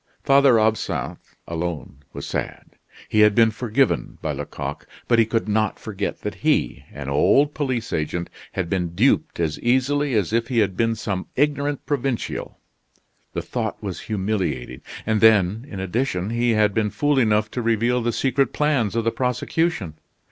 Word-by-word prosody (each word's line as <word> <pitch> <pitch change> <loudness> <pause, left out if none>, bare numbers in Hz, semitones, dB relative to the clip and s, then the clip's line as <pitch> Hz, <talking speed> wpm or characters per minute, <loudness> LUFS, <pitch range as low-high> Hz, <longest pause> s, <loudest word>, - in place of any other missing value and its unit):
Father 135 -4 +5
Absinthe 110 0 -2
alone 85 -4 -4
was - - -7
sad. - - -5 0.4
He 110 - +1
had 105 -1 +6
been 115 -1 +5
forgiven 125 +3 0
by - - -2
Lecoq, - - -6 0.2
but 120 -1 +4
he 115 - +4
could 115 0 -1
not 110 +1 +1
forget 105 -2 -4
that - - -3
he, - - +1
an 70 -1 -7
old 140 - +3
police 130 -6 -2
agent, 85 +2 -2 0.3
had 95 -3 -2
been 85 -2 -2
duped - - +2
as 80 -3 -1
easily 130 +2 +1
as 105 -1 0
if 115 0 +1
he 125 - -2
had 100 -4 +2
been 115 +2 +1
some 100 -4 -3
ignorant 145 0 0
provincial. 135 -4 -2 0.8
The - - -3
thought - - -4
was - - -4
humiliating, 95 - -2 0.2
and 110 -1 +1
then 110 +2 +4
in 100 - -6
addition 95 0 -1
he 120 0 +2
had 105 -1 +3
been 105 0 +1
fool 145 +4 +1
enough 110 -2 +2
to 125 - -3
reveal 115 +2 +1
the 120 0 0
secret 135 +1 +1
plans 140 -9 +1
of 115 - +1
the 115 - +1
prosecution! 125 - -1
110 Hz, 165 wpm, -23 LUFS, 100-125 Hz, 0.8 s, had